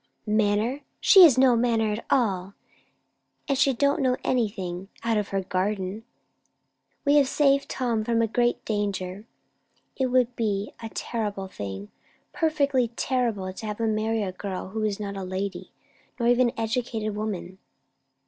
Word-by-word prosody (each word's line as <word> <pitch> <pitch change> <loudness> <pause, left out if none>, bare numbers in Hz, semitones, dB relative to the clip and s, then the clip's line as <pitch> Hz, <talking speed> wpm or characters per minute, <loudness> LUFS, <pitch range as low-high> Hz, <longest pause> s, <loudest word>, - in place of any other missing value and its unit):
"Manner? 215 +5 +1 0.2
She 390 - +7
has 315 -9 +8
no 260 -2 +5
manner 230 -2 +1
at 215 - -5
all; 200 -6 +1 0.9
and 275 - +1
she 275 +1 +3
don't 280 +3 +1
know 255 -1 +2
anything, 195 -7 -1 0.2
out 230 -1 +1
of 210 -2 0
her 195 -1 -2
garden. 190 +3 -2 1.0
We 290 +1 +5
have 280 -2 +5
saved 275 0 +2
Tom 235 -4 -1
from 230 +1 +1
a 230 - +3
great 240 +2 0
danger. 200 -2 -3 0.7
It 265 - 0
would 250 -1 +2
be 210 -3 -2
a 225 - -5
terrible 205 -4 -3
thing, 100 - -7 0.4
perfectly 285 -6 +1
terrible, 230 -9 -1
to 220 - -8
have 210 +1 -5
him 225 -1 +1
marry 220 0 0
a 190 - -3
girl 185 0 -5
who 220 +3 -4
is 210 -1 -1
not 200 -1 -4
a 195 - -5
lady, 185 0 -4 0.5
nor 235 - +1
even 245 0 +4
an 235 - -9
educated 225 -2 -2
woman." 195 -3 -4
220 Hz, 160 wpm, -26 LUFS, 200-245 Hz, 1.0 s, has